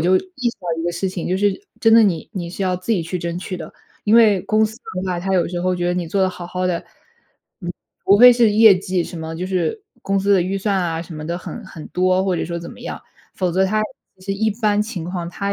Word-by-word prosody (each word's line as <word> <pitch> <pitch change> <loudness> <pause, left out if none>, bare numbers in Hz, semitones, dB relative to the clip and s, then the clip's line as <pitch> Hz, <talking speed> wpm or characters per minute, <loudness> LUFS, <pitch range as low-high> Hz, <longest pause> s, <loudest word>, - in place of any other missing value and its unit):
就 180 +3 +4
意 275 - -2
识 - - -16
到 175 - -7
一 - - -3
个 175 - -1
事 190 +3 -2
情， 185 -2 -4
就 185 - +1
是 205 - 0
真 225 -1 +5
的 230 - +8
你 175 -7 0
你 175 -5 -4
是 190 +3 -5
要 185 -1 +1
自 185 +6 -2
己 180 - +1
去 170 +2 -4
争 170 0 -3
取 185 0 -5
的， - - -9 0.3
因 210 - +3
为 215 -5 +6
公 215 0 +2
司 220 +1 -4
的 185 -6 -6
话， 180 -1 -1
它 190 +1 -1
有 175 - +2
时 175 0 -3
候 185 0 +1
觉 175 0 -1
得 175 - +1
你 180 -2 -2
做 190 +4 0
得 185 - +2
好 175 -1 -8
好 185 +1 -2
的， 175 -2 0 0.8
嗯， 175 - -4 0.3
除 200 +1 +5
非 245 +1 +10
是 235 -2 +4
业 215 -1 +7
绩 185 -2 -1
什 170 - -8
么 160 0 -5
就 180 - -3
是 190 - -1 0.2
公 195 0 0
司 200 +1 +2
的 195 - +5
预 185 +3 -1
算 200 +1 0
啊， 165 -2 -2
什 170 - -11
么 155 0 -6
的 170 +1 -2
很 230 +5 -7
很 160 -4 -10
多， 185 +1 +2
或 185 -2 +1
者 - - -1
说 170 0 -4
怎 170 - -8
么 - - -13
样。 - - -6 0.3
否 185 -2 0
则 190 +2 +3
它 215 +3 +1 0.4
其 185 - -17
实 195 - -1
一 220 +2 +1
般 210 -1 +1
情 210 -6 -4
况， 175 -1 -4
它 200 +3 -3
185 Hz, 300 characters per minute, -20 LUFS, 175-205 Hz, 0.8 s, 非